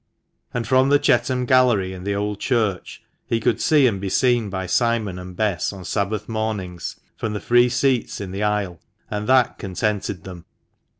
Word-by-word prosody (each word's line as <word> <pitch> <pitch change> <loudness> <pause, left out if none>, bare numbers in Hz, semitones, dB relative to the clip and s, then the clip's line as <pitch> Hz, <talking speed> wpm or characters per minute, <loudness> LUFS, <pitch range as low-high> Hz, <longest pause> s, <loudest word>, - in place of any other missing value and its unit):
And 120 -2 -3
from 130 +2 +4
the 145 - +6
Chetham 130 -2 +1
Gallery 120 -7 +3
in 90 0 -9
the 100 0 -1
Old 105 0 -2
Church 110 -8 -1 0.2
he 115 - 0
could - - 0
see 155 -5 +4
and 100 -6 +1
be 100 - -2
seen 120 0 +2
by 95 -1 -3
Simon 110 -2 0
and 90 0 -9
Bess 100 -5 0
on 95 -3 -10
Sabbath 100 +3 -2
mornings 110 -6 -4 0.2
from 110 -2 -3
the 105 - -3
free 120 +2 +4
seats 130 0 0
in 100 -2 -6
the 95 +2 -4
aisle, 105 -5 -1 0.3
and 105 0 -3
that 130 -2 +3
contented 100 -1 -2
them. 90 -3 -10
105 Hz, 180 wpm, -22 LUFS, 95-120 Hz, 0.3 s, the